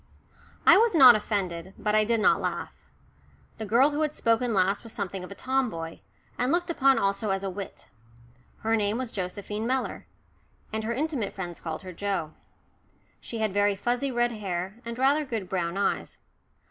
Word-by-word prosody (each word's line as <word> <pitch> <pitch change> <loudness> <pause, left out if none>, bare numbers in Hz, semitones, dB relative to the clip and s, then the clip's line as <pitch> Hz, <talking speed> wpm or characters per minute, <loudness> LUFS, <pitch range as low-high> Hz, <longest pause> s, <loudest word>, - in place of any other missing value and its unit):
I - - +9
was 455 -2 +3
not 260 -6 +10
offended. 190 -4 -2
But 210 - -1
I 215 0 +4
did 230 +1 +1
not 215 - +4
laugh. - - -3 0.9
The 220 - -4
girl 255 +7 +4
who 295 +1 -2
had 305 -1 0
spoken 230 +1 +1
last 195 -1 +2
was 230 - -10
something 195 -3 -4
of 180 - -8
a 200 - -8
tomboy, 225 -13 -2 0.4
and 250 +2 +1
looked 350 0 +1
upon 270 -4 +4
also 200 +2 0
as 195 0 -1
a 195 - -2
wit. 195 +1 -8 0.8
Her 225 +1 +2
name 210 0 +1
was 255 -2 -4
Josephine 205 +3 -4
Mellor, 260 +1 -2 0.7
and 220 0 -2
her 230 - -1
intimate 280 -6 -2
friends 175 -3 -6
called 160 +1 -5
her 185 -1 -8
Joe. 175 -4 -2 0.9
She 230 - -7
had 215 -3 -1
very 205 0 +2
fuzzy 245 +6 -1
red 240 0 +1
hair, 190 -2 -4
and 235 0 -5
rather 275 +4 +3
good 225 -9 -4
brown 175 -1 -2
eyes. 200 - -1
215 Hz, 180 wpm, -27 LUFS, 195-250 Hz, 0.9 s, not